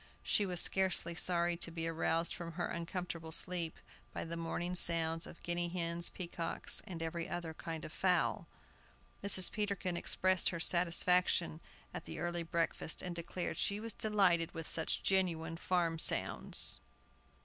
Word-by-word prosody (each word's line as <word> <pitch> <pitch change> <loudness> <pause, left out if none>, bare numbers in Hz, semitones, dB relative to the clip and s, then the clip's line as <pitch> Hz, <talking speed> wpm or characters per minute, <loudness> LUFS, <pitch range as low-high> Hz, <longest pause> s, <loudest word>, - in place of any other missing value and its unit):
She 205 - +1
was 180 -2 -1
scarcely 185 -3 +3
sorry 175 0 +1
to 170 - -1
be 165 0 -4
aroused 165 0 -1
from 170 -2 -7
her 175 +1 -2
uncomfortable 170 -1 -5
sleep 170 0 -1 0.4
by - - -3
the 165 0 -5
morning 170 +2 -3
sounds 165 -1 0
of - - -13
guinea 175 0 -1
hens, 170 -1 0
peacocks, 170 -2 -3
and 170 -3 -5
every 165 +1 -4
other 170 -2 -4
kind 160 0 -6
of 155 - -9
fowl. 180 -2 +1 0.8
Mrs. 190 -2 +7
Peterkin 200 -4 -2
expressed 185 +1 +2
her 170 - -4
satisfaction 175 -1 +2 0.3
at - - -7
the - - -7
early 175 0 -2
breakfast, 165 -1 -2
and 180 -1 -4
declared 175 +1 -4
she 200 +1 0
was 225 0 -3
delighted 190 -7 +1
with 165 -1 -5
such 160 - -1
genuine 170 -4 0
farm 170 -1 0
sounds. - - +4
170 Hz, 150 wpm, -35 LUFS, 165-180 Hz, 0.8 s, Mrs